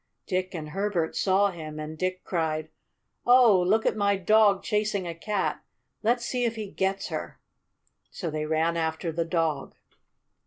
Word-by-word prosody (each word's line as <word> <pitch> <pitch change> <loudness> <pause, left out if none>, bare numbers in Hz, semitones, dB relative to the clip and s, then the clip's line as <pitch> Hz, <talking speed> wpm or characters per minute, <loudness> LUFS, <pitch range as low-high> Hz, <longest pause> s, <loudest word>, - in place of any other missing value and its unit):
Dick 185 0 -2
and 155 -2 -5
Herbert 190 -2 -1
saw 200 +1 +3
him, 155 -3 -7
and 155 +1 -6
Dick 185 +2 -2
cried: 160 -3 -2 0.5
"Oh, 240 -6 +6
look 210 +5 +2
at - - +2
my 200 -1 +2
dog 205 +1 +4
chasing 210 -2 0
a 170 - -3
cat. 200 +4 -2 0.4
Let's 235 +2 +1
see 250 0 -1
if 230 -1 0
he 215 -3 -6
gets 190 +1 -1
her." - - -5 0.7
So 170 -6 -5
they 155 0 -3
ran 160 +2 +1
after 160 +1 -1
the 165 +1 -1
dog. 165 -4 -1
185 Hz, 160 wpm, -27 LUFS, 160-210 Hz, 0.7 s, Oh